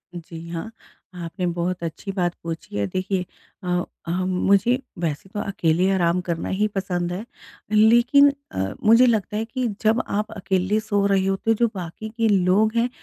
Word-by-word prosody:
जी 170 -1 -8
हाँ, 170 +6 -5 0.5
आपने 180 +2 -4
बहुत 175 +1 -2
अच्छी 170 +4 -5
बात 175 -3 0
पूछी 165 -9 -5
है। 100 - +1
देखिए 185 0 -2 0.4
अ, 180 -1 0 0.2
हम 185 +2 -1 0.2
मुझे 235 +6 +4 0.2
वैसे 165 +2 -3
तो 210 - -3
अकेले 180 -1 +1
आराम 175 -1 +2
करना 170 -2 -3
ही 210 +3 +1
पसंद 180 -2 -1
है, 200 +5 -5 0.5
लेकिन 240 +6 +6 0.2
अ, 95 +1 -2
मुझे 230 +4 +7
लगता 215 -2 +1
है 220 - -1
कि 250 +1 -2
जब 225 +2 +3
आप 210 +2 -2
अकेले 190 +2 0
सो 205 -2 0
रहे 195 -1 +2
होते 195 +3 0
हो 225 - +4
जो 235 - +4
बाक़ी 185 +4 -6
के 230 - +2
लोग 200 +3 +3
हैं, 235 +1 +2
190 Hz, 175 wpm, -23 LUFS, 175-220 Hz, 0.5 s, मुझे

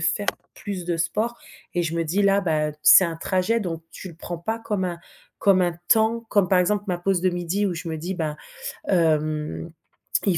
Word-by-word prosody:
faire 165 +5 0 0.3
plus 195 -4 -5
de 170 -1 0
sport 220 +8 -1 0.4
et 175 - +1
je 165 0 -2
me 165 - 0
dis: 185 +6 +1
«Là 200 0 +4
beh, 155 -5 0
c'est 185 - +9
un 165 -2 -3
trajet, 185 +7 +1
donc 165 -4 -4
tu 185 - -8
le 170 - -11
prends 170 0 -6
pas 220 +7 -3
comme 205 -4 -2
un 175 -1 -3 0.4
comme 195 -2 +4
un 175 -1 +1
temps», 225 +1 +4
comme 200 -3 +3
par 185 -1 +4
exemple 205 +3 +1
ma 180 -1 0
pause 185 0 +1
de 185 - +2
midi 175 +3 -1
où 180 - -1
je 165 +1 -6
me 160 -1 -3
dis: 180 +4 -4
«Ben, 155 -4 -3 0.5
hem, 155 - +1 0.6
il 180 -4 +3
180 Hz, 215 wpm, -24 LUFS, 165-200 Hz, 0.6 s, c'est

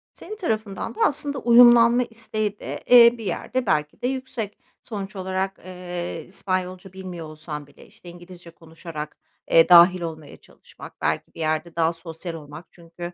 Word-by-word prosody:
senin, 425 - -9
tarafından 220 - -3
da - - -12
aslında 285 0 -1
uyumlanma 240 0 +6
isteği 215 -3 -4
de, - - -7
eee, 240 -1 +8
bir 225 - -8
yerde 245 +7 -3
belki 150 -6 -1
de 245 - 0
yüksek. 255 -5 -5 0.2
Sonuç 205 -2 -7
olarak, 190 0 -3
eee, 180 -2 -6
İspanyolca 185 0 -4
bilmiyor 185 -3 -8
olsan 155 -1 -8
bile, 145 - -18
işte, 175 - -15
İngilizce 175 0 -13
konuşarak, 160 -2 -9 0.3
eee, 165 +1 +6
dâhil 175 +1 +7
olmaya 160 -3 -7
çalışmak - - -16
belki - - -2
bir - - -12
yerde 155 +1 -2
daha 165 0 +1
sosyal 165 +1 -8
olmak. 155 +1 -10
Çünkü, 175 0 -10
180 Hz, 155 wpm, -23 LUFS, 165-220 Hz, 0.3 s, eee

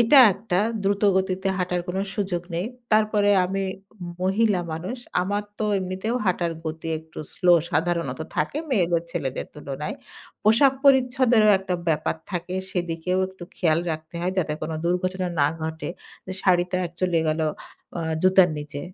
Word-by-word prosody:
এটা 235 +5 +7 0.2
একটা 195 -2 -1 0.2
দ্রুত 200 +1 0
গতিতে 190 0 0
হাঁটার 180 -1 0
কোন 180 - -2 0.2
সুযোগ 185 -4 -1
নেই। 175 +4 -1 0.3
তারপরে 215 -1 +3
আমি 195 +1 -1 0.6
মহিলা 195 0 +2
মানুষ। 180 +10 -4 0.2
আমার 205 +2 -1 0.2
তো 215 - 0
এমনিতেও 190 +5 -2
হাঁটার 175 -2 +1
গতি 160 +1 -5
একটু 160 0 -13 0.2
স্লো 180 -1 +4 0.2
সাধারণত 165 -3 0 0.2
থাকে 155 - 0
মেয়ে 190 -9 +3 0.2
ছেলেদের 130 -4 -3
তুলনায়। 145 0 -5 0.5
পোশাক 230 +6 +5
পরিচ্ছদেরও 250 -4 +5
একটা 185 -1 -3
ব্যাপার 155 0 0
থাকে। 180 0 -3 0.2
সেদিকেও 175 0 -1
একটু 190 -2 -11
খেয়াল 165 -2 +2
রাখতে 160 +1 -8
হয় 180 +1 -1
যাতে 155 -4 0
কোন 155 - -3
দুর্ঘটনা, 185 +1 0
না 145 - +5 0.2
ঘটে। 160 +1 -4 0.4
যে, 185 - -4
শাড়ি 180 -2 +4
তা 185 - +1 0.2
চলে 180 -2 +2
গেল 155 +1 0 0.6
আ - - -2 0.2
জুতার 185 -1 +6
নিচে। 145 -1 -6
185 Hz, 150 wpm, -24 LUFS, 165-200 Hz, 0.6 s, এটা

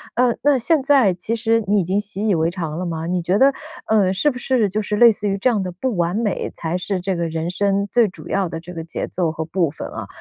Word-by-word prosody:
呃， 245 -1 +3
那 285 -1 +4
现 305 +5 +2
在 265 -9 +4
其 185 +6 -3
实 230 0 +1
你 205 +1 +3
已 - - -1
经 190 +4 0
习 205 0 -4
以 205 - +3
为 160 +1 +1
常 165 -4 -4
了 180 - -3
吗？ 165 -1 -4
你 180 0 0
觉 180 +4 +1
得， 270 +3 +5 0.4
呃， 200 -4 +3
是 245 +10 +2
不 250 - -8
是 240 -5 +1
就 210 - -1
是 210 0 -2
类 235 0 +8
似 205 0 -3
于 195 0 0
这 250 +6 +2
样 215 -5 +1
的 180 -1 -4
不 230 +4 -2
完 175 +1 0
美， 215 -3 -1
才 165 +2 -2
是 185 +1 -2
这 190 +1 -1
个 170 -1 -1
人 160 +1 -3
生 200 +1 0
最 235 -3 +4
主 185 - -11
要 195 -2 0
的 165 0 -6
这 180 +2 -10
个 165 -1 -5
节 170 - -4
奏 175 -3 -1
和 160 0 -4
部 165 -1 0
分 150 - -7
啊？ - - -7
195 Hz, 300 characters per minute, -20 LUFS, 175-225 Hz, 0.4 s, 类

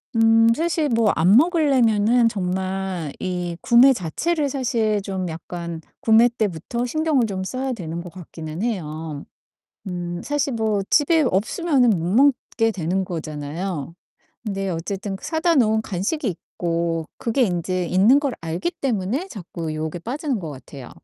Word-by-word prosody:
음 225 0 +5
사실 320 -2 0
뭐 225 -3 +3
안 180 +6 +4
먹을려면은 250 - +3
정말 190 -4 -3
이 180 -2 -3
구매 250 +3 +6
자체를 285 - -1
사실 230 -6 0
좀 190 -2 -3
약간 170 0 -6 0.2
구매 225 +2 +5
때부터 220 +1 -2
신경을 310 -2 +1
좀 190 -3 -3
써야 255 +6 -3
되는 170 -5 -5
것 175 - -9
같기는 165 -2 -8
해요. 160 -9 -4 0.6
음 175 -1 -4
사실 285 -2 -1
뭐 220 -3 0
집에 315 +2 +4
없으면은 250 - +2
못 170 -4 -1
먹게 250 -3 +3
되는 185 0 -1
거잖아요. 160 0 -5 0.5
근데 195 -3 -3
어쨌든 195 +4 -4
사다 325 +1 +1
놓은 220 -4 +3
간식이 220 - -2
있고 170 -2 -2
그게 245 +3 +1
인제 180 -2 -1
있는 210 +10 +5
걸 280 -3 -1
알기 165 - -2
때문에 245 - -1
자꾸 170 - -6
유혹에 155 +2 -4
빠지는 265 - -3
것 160 -5 -6
같아요 135 -1 -10
200 Hz, 280 characters per minute, -22 LUFS, 175-250 Hz, 0.6 s, 구매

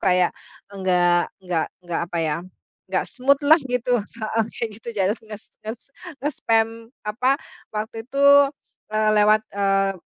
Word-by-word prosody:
kayak, 180 -2 +3 0.4
enggak 180 -2 +2
nggak 180 -3 -1 0.2
nggak 175 -1 -2
apa 170 - -3
ya. 155 -2 0 0.5
Nggak - - 0
smooth-lah 280 +4 +4
gitu. 250 -1 +1
Heeh, 220 +1 -2
kayak 230 -2 -3
gitu. 235 - -11
Jales 195 +3 +1
nges 215 -1 -10 0.2
nges 220 +2 -5 0.4
nge-spam 225 -6 +2 0.4
apa, 250 +6 +1 0.4
waktu 220 +2 -4
itu, 275 +1 -1 0.7
eee, 215 0 +3
lewat, 215 +1 +5
eee, 195 -1 +2
215 Hz, 130 wpm, -23 LUFS, 190-235 Hz, 0.7 s, lewat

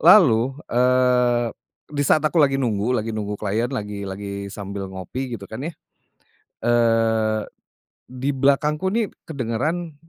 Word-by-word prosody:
Lalu, 130 - +6 0.2
eee, 125 -1 +3 0.4
di 145 - -1
saat 150 +2 +3
aku 160 +1 +3
lagi 135 -2 +4
nunggu 120 -1 0
lagi 110 +1 -2
nunggu 105 -1 -3
klien 110 +4 -1
lagi 105 -6 -4
lagi 100 +1 -5
sambil 100 -1 -6
ngopi, 115 +7 -5
gitu 100 - -10
kan 110 +4 -8
ya. - - -6 1.0
Eee, 115 -2 +2 0.6
di 130 +2 -2
belakangku 150 +6 +2
nih 225 0 +1 0.2
kedengeran, 150 +5 -2
120 Hz, 130 wpm, -22 LUFS, 105-135 Hz, 1.0 s, Lalu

